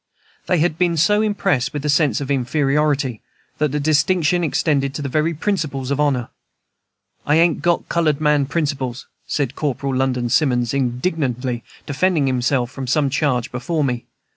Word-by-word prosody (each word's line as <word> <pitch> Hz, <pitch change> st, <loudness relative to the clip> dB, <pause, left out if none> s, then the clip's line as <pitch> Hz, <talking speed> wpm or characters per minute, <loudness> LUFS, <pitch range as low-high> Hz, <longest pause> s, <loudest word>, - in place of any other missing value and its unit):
They 180 Hz, -, +2 dB
had 160 Hz, 0 st, 0 dB
been 175 Hz, -2 st, +2 dB
so 210 Hz, +7 st, +3 dB
impressed 190 Hz, -, 0 dB
with 145 Hz, 0 st, -4 dB
a -, -, +1 dB
sense 145 Hz, -5 st, +2 dB
of 140 Hz, -1 st, -4 dB
inferiority 140 Hz, -1 st, 0 dB, 0.4 s
that 150 Hz, -2 st, +1 dB
the 150 Hz, -, -1 dB
distinction 155 Hz, +3 st, +2 dB
extended 140 Hz, -3 st, 0 dB
to 145 Hz, -, -4 dB
the 140 Hz, -, -3 dB
very 155 Hz, +4 st, 0 dB
principles 145 Hz, -7 st, -2 dB
of 140 Hz, -, 0 dB
honor. 135 Hz, -5 st, +1 dB, 0.9 s
"I 150 Hz, -, +2 dB
ain't 165 Hz, -1 st, +3 dB
got 175 Hz, 0 st, +1 dB
colored 155 Hz, -4 st, +1 dB
man 150 Hz, -2 st, +2 dB
principles," 135 Hz, -5 st, -2 dB, 0.2 s
said 135 Hz, -4 st, -1 dB
Corporal 140 Hz, -2 st, -2 dB
London 130 Hz, -2 st, 0 dB
Simmons, 125 Hz, -2 st, +2 dB
indignantly 125 Hz, -2 st, -1 dB, 0.2 s
defending 160 Hz, +1 st, +1 dB
himself 125 Hz, -1 st, 0 dB
from 135 Hz, -2 st, -6 dB
some 140 Hz, +2 st, +1 dB
charge 130 Hz, -4 st, 0 dB
before 150 Hz, +5 st, -2 dB
me. 125 Hz, -3 st, -2 dB
145 Hz, 160 wpm, -20 LUFS, 130-155 Hz, 0.9 s, so